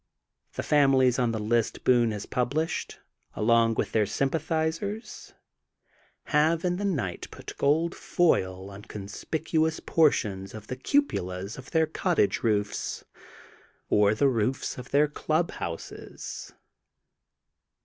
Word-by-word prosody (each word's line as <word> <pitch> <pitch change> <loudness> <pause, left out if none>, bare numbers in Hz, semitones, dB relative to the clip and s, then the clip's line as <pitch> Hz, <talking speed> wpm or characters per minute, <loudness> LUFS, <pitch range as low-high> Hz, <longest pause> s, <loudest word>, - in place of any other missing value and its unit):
The - - -4
families 135 -4 +4
on 120 -2 +2
the 115 - -2
list 110 +1 0
Boone 120 -2 +4
has 105 -2 -4
pubUshed, 145 +6 -2 0.4
along 115 +1 +3
with - - -1
their 110 -2 +2
sympathizers, 160 - -2 0.9
have 160 +3 +2
in 180 0 +1
the 205 - -2
night 130 - -2
pnt - - -9
gold 160 +4 +2
foil 95 - 0
on 100 +1 -10
conspicuous 160 - -2
portions 105 -11 +1
of 110 -1 -9
the 130 - -5
cupolas 100 - -1
of 130 - -11
their 160 -1 +3
cottage 160 - +1
roofs 105 -3 -1 0.8
or 105 0 +4
the 140 +6 +3
roofs 125 0 0
of 125 - -9
their 145 +2 +4
club 155 +3 -1
houses. 85 -1 -7
130 Hz, 120 wpm, -27 LUFS, 105-160 Hz, 0.9 s, families